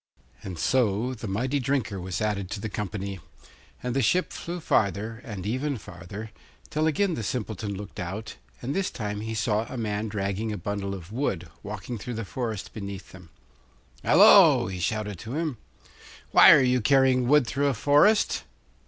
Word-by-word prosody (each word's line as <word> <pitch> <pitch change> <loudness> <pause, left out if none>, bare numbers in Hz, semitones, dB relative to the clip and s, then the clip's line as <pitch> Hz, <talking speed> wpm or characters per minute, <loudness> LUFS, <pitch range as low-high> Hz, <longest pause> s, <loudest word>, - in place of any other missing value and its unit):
And 95 -3 -7
so 120 +2 +1
the 115 -2 -7
mighty 125 +8 -1
drinker 130 -7 -1
was 90 +1 -4
added 100 -3 -1
to 105 - -4
the 110 - -4
company; 100 -1 -4 0.6
and 125 0 -2
the 135 - +2
ship 180 +10 +1
flew 175 +1 -5
farther, 110 - 0
and 105 -7 -7
even 130 +5 -1
farther, 100 +3 -9 0.4
till 155 +1 +1
again 185 +4 +1
the 120 - -3
Simpleton 105 -2 -3
looked 100 0 -9
out, 100 +5 -5 0.3
and 130 +4 -2
this 195 -1 0
time 105 -3 -4
he 110 +1 -4
saw 110 +1 0
a 130 - -5
man 105 -1 -2
dragging 100 +1 -2
a 105 - -3
bundle 100 +1 -3
of 90 0 -10
wood, 100 - -2
walking 105 +3 -6
through 120 +4 -5
the 115 -1 -4
forest 110 -2 -4
beneath 100 -2 -7
them. 90 -3 -14 0.7
'Hallo!' - - +7
he 90 -1 -5
shouted 105 0 -2
to 115 +5 -6
him, 155 -5 -2 0.7
'why - - +9
are 135 - +7
you 125 -1 +2
carrying 130 0 +3
wood 150 0 +5
through 140 +4 0
a 135 - +1
forest? 150 - +3
110 Hz, 175 wpm, -26 LUFS, 100-130 Hz, 0.7 s, why